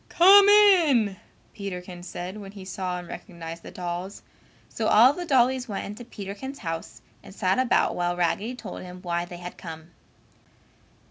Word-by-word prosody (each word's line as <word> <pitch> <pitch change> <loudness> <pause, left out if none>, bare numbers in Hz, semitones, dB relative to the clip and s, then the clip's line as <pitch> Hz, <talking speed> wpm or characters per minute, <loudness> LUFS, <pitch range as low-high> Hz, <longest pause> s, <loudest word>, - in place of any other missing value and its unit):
"Come 395 +3 +7
in," 330 - +5 0.4
Peterkins 180 -3 -7
said 180 +3 -6
when 200 -1 -10
he 195 -2 -10
saw 185 -1 -4
and 175 -1 -8
recognized 170 -3 -8
the - - -10
dolls, 180 +2 -6 0.4
so 220 - -3
all 240 +6 +6
the 350 +2 -6
dollies 260 -2 +2
went 200 - -4
into 210 +4 -8
Peterkins' 230 +4 -8
house 165 0 -5 0.2
and 190 - -14
sat 190 +2 +1
about 255 -2 +2
while 175 0 -1
Raggedy 185 +8 -1
told 210 -6 -8
him 180 0 -10
why 175 -1 -1
they 175 0 -9
had 175 0 -9
come. 160 -1 -9
195 Hz, 160 wpm, -25 LUFS, 175-245 Hz, 0.4 s, Come